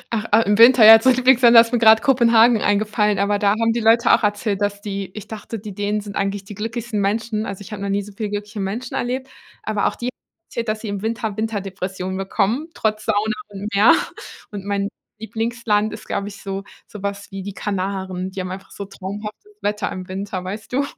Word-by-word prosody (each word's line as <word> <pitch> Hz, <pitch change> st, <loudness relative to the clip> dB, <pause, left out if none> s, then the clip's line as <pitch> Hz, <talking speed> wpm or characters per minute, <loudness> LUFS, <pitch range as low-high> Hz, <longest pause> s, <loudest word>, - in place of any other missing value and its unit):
Ach, 215 Hz, -1 st, -2 dB
äh, 225 Hz, -, +5 dB
im 205 Hz, +2 st, +1 dB
Winter, 235 Hz, -1 st, +8 dB
ja, 225 Hz, 0 st, +11 dB
zu 260 Hz, -, +3 dB
meinen 255 Hz, -, +5 dB
Lieblingsländern, 250 Hz, -2 st, +5 dB
da 230 Hz, 0 st, +9 dB
ist 230 Hz, -, -11 dB
mir 240 Hz, -, +3 dB
grad 220 Hz, -1 st, +6 dB
Kopenhagen 235 Hz, -3 st, +5 dB
eingefallen, 210 Hz, 0 st, +1 dB
aber 200 Hz, +1 st, +1 dB
da 200 Hz, -1 st, +3 dB
haben 230 Hz, 0 st, +2 dB
die 240 Hz, -, -1 dB
Leute 230 Hz, +1 st, +4 dB
auch -, -, +4 dB
erzählt, 205 Hz, -1 st, -1 dB
dass 205 Hz, 0 st, -1 dB
die 200 Hz, -2 st, -5 dB
ich 210 Hz, -1 st, -8 dB
dachte, 220 Hz, +1 st, -7 dB
die 210 Hz, -1 st, -8 dB
Dänen 205 Hz, +1 st, -2 dB
sind 200 Hz, -1 st, -9 dB
eigentlich 200 Hz, 0 st, -2 dB
die 205 Hz, -, -9 dB
glücklichsten 225 Hz, +1 st, -3 dB
Menschen, 215 Hz, +2 st, -1 dB
also 200 Hz, 0 st, -6 dB
ich 200 Hz, -, -11 dB
habe 195 Hz, -, -6 dB
noch 200 Hz, -, -3 dB
nie 200 Hz, +1 st, 0 dB
so 210 Hz, -, -11 dB
viele 215 Hz, -1 st, -3 dB
glückliche 210 Hz, +1 st, -5 dB
Menschen 215 Hz, +6 st, -4 dB
erlebt. 255 Hz, +2 st, -2 dB, 0.4 s
Aber 215 Hz, -1 st, 0 dB
auch -, -, -2 dB
die 240 Hz, -, -6 dB
haben 255 Hz, -, -1 dB, 0.4 s
erzählt, 235 Hz, 0 st, -4 dB
dass 215 Hz, 0 st, -2 dB
sie 220 Hz, -, -5 dB
im 200 Hz, -1 st, -4 dB
Winter 220 Hz, -1 st, -3 dB
Winterdepressionen 190 Hz, -3 st, -4 dB
bekommen, 205 Hz, +9 st, -1 dB
trotz 215 Hz, -1 st, -1 dB
Sauna 215 Hz, 0 st, +1 dB
und 205 Hz, +1 st, -7 dB
Meer. 205 Hz, +4 st, +6 dB, 0.6 s
Und 200 Hz, -2 st, -7 dB
mein 200 Hz, 0 st, -1 dB, 0.3 s
Lieblingsland 225 Hz, -1 st, -1 dB
ist, 215 Hz, -, -9 dB
glaube 200 Hz, 0 st, -3 dB
ich, 200 Hz, -1 st, -10 dB
so, 195 Hz, 0 st, -4 dB, 0.2 s
sowas 200 Hz, -1 st, -6 dB
wie 195 Hz, 0 st, -6 dB
die 200 Hz, +1 st, -6 dB
Kanaren. 190 Hz, -1 st, -3 dB
Die 190 Hz, -, -8 dB
haben 185 Hz, 0 st, -4 dB
einfach 190 Hz, +1 st, -8 dB
so 200 Hz, -, -7 dB
traumhaftes 205 Hz, -, -8 dB
Wetter 210 Hz, 0 st, -2 dB
im 185 Hz, -1 st, -7 dB
Winter, 190 Hz, 0 st, -5 dB
weißt 210 Hz, +5 st, -7 dB
du? 275 Hz, -, +2 dB
210 Hz, 225 wpm, -21 LUFS, 200-225 Hz, 0.6 s, ja